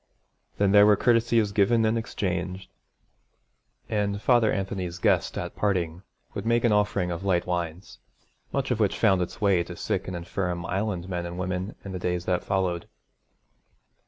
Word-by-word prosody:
Then 100 -1 +3
there 105 0 +7
were 105 - +6
courtesies 115 -2 +2
given 110 +3 +3
and 110 +1 +2
exchanged; 95 -4 -3 1.2
and 100 -1 -1
Father 120 -1 +3
Anthony's 95 -3 -3
guest - - +1
at - - -5
parting 90 -4 -1 0.3
would - - -4
make 115 +1 +2
an 120 - +3
offering 105 -3 +1
of 85 +2 -4
light 90 -3 +1
wines, 90 0 -4 0.5
much 135 -1 -1
of 120 - 0
which 105 -3 +1
found 95 -5 +3
its 90 +5 -4
way 95 -4 +3
to 90 +1 -9
sick - - -2
and 95 -1 -4
infirm 85 0 -3
Island 95 -1 -2
men 90 -2 -3
and 85 +1 -7
women 95 +2 -3
in 100 - -5
the 90 - -4
days 90 0 -2
that 90 -1 0
followed. 95 -3 -1
95 Hz, 165 wpm, -26 LUFS, 90-105 Hz, 1.2 s, there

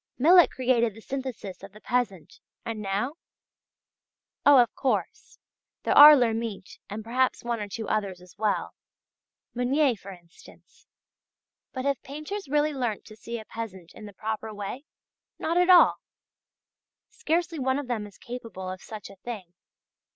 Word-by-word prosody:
Millet 335 +2 +7
created 240 -4 +1
the 225 - -12
synthesis 260 -7 -6
of 195 0 -12
the 210 - -13
peasant, 220 - -2 0.3
and 225 -2 -4
now? 210 +10 -2 1.3
Oh, 285 -1 +8
of 240 -2 +4
course, 215 -10 -2 0.5
there - - +1
are 295 +1 +11
Lhermitte 225 -6 -2
and 210 +2 -6
perhaps 255 +3 0
one 235 -1 -2
or 205 - -4
two 220 +1 -6
others 200 -4 -2
as 180 0 -17
well 215 -2 -1 0.8
Meunier, 255 +2 +2
for 200 -1 -12
instance. 175 -3 -16 0.8
But 260 0 -5
have 280 -3 0
painters 305 +5 -7
really 295 +1 +2
learnt 240 -6 -3
to 215 - -13
see 235 +2 -6
a 220 - -9
peasant 190 -7 -8
in 215 - -10
the 205 - -12
proper 220 +2 -4
way? 210 +7 -6 0.5
Not 335 +2 -1
at 360 +1 +3
all! 360 -1 +7 1.1
Scarcely 335 0 -2
one 260 0 +1
of 290 - -4
them 220 -4 -3
is 200 - -17
capable 225 -7 -7
of 185 - -8
such 215 -3 -9
a 195 - -15
thing. 190 -5 -8
230 Hz, 155 wpm, -27 LUFS, 205-265 Hz, 1.3 s, are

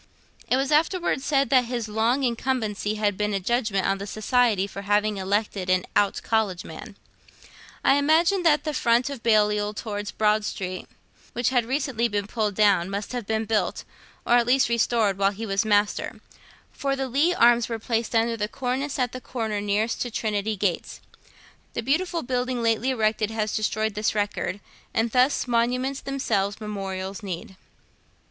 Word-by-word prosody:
It 255 - +3
was 270 +1 -1
afterwards 320 -2 +1
said 275 -3 +1
that 255 -2 +5
his 235 -2 -3
long 225 +5 +1
incumbency 230 -4 -1
had 210 -2 0
been 210 -1 0
a - - 0
judgment 215 -1 0
on 195 0 0
the 200 - -6
Society 215 -1 +2
for 200 0 -7
having 205 +1 +1
elected 195 -1 -1
an 185 0 +2
Out 205 -1 +2
College 210 -5 0
Man. - - -10 0.9
I 270 - +5
imagine 330 +6 +3
that 310 -3 +3
the 305 - -2
front 240 +1 +2
of 270 -4 -7
Balliol 210 -2 +2
towards 205 -2 -4
Broad 215 +1 +1
Street 185 -3 -5 0.5
which 240 0 +1
has 245 -3 +1
recently 260 -2 0
been 205 -2 -2
pulled 210 -1 -2
down 195 -4 +3
must 200 +1 -4
have 245 -4 -4
been 220 0 0
built, 215 0 -1 0.4
or 240 - +5
at 240 -1 +2
least 260 0 +3
restored, 225 -4 +1
while 195 0 +4
he 210 +3 -6
was 195 0 0
Master, 205 -1 +1 0.5
for 275 -1 -2
the 270 -1 -2
Leigh 295 +8 +2
arms 235 -3 +4
were 230 - -2
placed 230 +1 -2
under 230 +1 +2
the 210 -2 -2
cornice 265 +4 -3
at 250 -2 0
the 255 - -7
corner 220 -5 -3
nearest 210 +3 0
to 245 - -1
Trinity 215 -1 -1
gates. 190 -3 -2 0.7
The 235 - -3
beautiful 335 +6 0
building 250 -1 -1
lately 230 +2 +1
erected 220 -3 +1
has 215 -1 -2
destroyed 215 0 0
this 210 +1 -1
record, 205 -2 -2 0.3
and 225 +1 +1
thus 255 +2 +2
'monuments 250 +3 0
themselves 205 -7 -1
memorials 195 -2 -5
need.' 190 -1 -6
225 Hz, 170 wpm, -25 LUFS, 205-250 Hz, 0.9 s, that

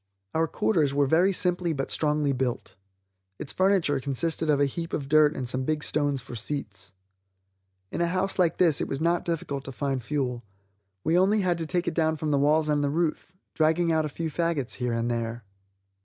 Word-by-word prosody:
Our 160 +1 +1
quarters 150 -7 +1
were 145 0 +3
very 170 +7 +3
simply 180 -2 +1
but 135 -2 -3
strongly 150 -2 +1
built. 125 -2 -3 0.6
Its 135 - -6
furniture 185 -7 +2
consisted 155 +4 -2
of 145 -2 +3
a 145 - +4
heap 165 +4 -5
of 140 -3 -2
dirt 155 +1 +4
and 130 - -4
some 130 +2 0
big 155 +2 -1
stones 145 -3 0
for 125 - -11
seats. 105 -6 -6 1.0
In - - -2
a 170 - +2
house 185 +2 -1
like 170 -2 +2
this 165 -5 +4
it - - -1
was 135 - -3
not 170 +2 +1
difficult 150 -5 -3
to 135 - -6
find 135 0 -2
fuel; 125 -2 -2 0.6
we 160 - +1
had 175 - +5
only 200 +2 +3
to 175 -2 0
take 175 +1 -1
it - - 0
down 160 -1 +1
from 155 0 -2
the 140 - +2
walls 150 +2 +3
and 145 -1 +1
the 145 - +1
roof, 165 +3 -2 0.2
dragging 165 +1 +2
out 160 -1 +2
a - - -3
few 160 +2 -4
faggots 165 -6 -1
here 125 -2 -1
and 115 +1 -1
there. 115 0 -3
150 Hz, 205 wpm, -26 LUFS, 135-170 Hz, 1.0 s, had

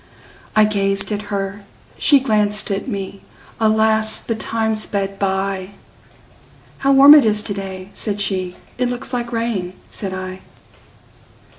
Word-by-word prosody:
I 215 0 +6
gazed 195 -1 0
at 205 0 -2
her, 200 0 -3 0.3
she 285 -2 +5
glanced 210 -4 +1
at 195 +4 -2
me; 195 -4 -5 0.4
Alas! 220 0 +3
the 230 - -4
time 220 0 -1
sped 200 -2 -3
by:"How 195 +7 -5
warm 275 +2 +9
it 300 - +8
is 210 -1 +1
to 200 - -3
day!" 190 -1 -7
said 205 -2 -4
she;"It 195 +5 -3
looks 245 +1 -5
like 240 -1 -2
rain," 230 -6 -2 0.2
said 195 -2 -5
I. 185 0 -6
210 Hz, 130 wpm, -19 LUFS, 195-220 Hz, 0.4 s, warm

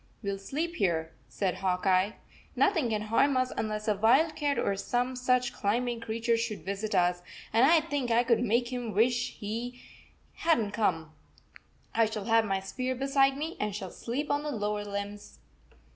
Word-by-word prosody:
"We 200 - -1
ll 195 - -4
sleep 325 - -3
here," 165 -4 0 0.2
said 185 -2 -1
Hawk 185 -1 -1
Eye. 190 +3 +3 0.4
"Nothing 335 - +2
can 215 -1 -1
harm 255 +5 +2
us 255 0 0
unless 215 0 -3
a 215 - +4
wildcat 280 +7 +2
or 200 - +1
some 245 +5 -1
such 250 -1 +1
climbing 235 +3 -1
creature 230 +1 0
should 215 -7 -3
visit 200 +2 -3
us, 175 -1 +2 0.3
and 235 +4 +6
I 325 +1 +6
think 285 -5 -2
I 235 +1 +4
could 235 -2 +3
make 240 +1 +1
him 240 -3 -3
wish 245 +3 +2
he 230 +4 -4 0.6
65 - - -11
had 325 - +6
n 220 - 0
t 200 - -6
come. 165 -7 0 0.8
I 230 - +4
shall 215 -2 -5
have 225 0 +4
my 195 -2 0
spear 255 +7 -3
beside 275 +1 +2
me 315 +3 -4
and 210 -1 -2
shall 195 -3 -5
sleep 275 +6 -3
on 290 0 +1
the 300 - -4
lower 210 -5 -2
limbs." 205 0 -6
230 Hz, 190 wpm, -29 LUFS, 205-255 Hz, 0.8 s, and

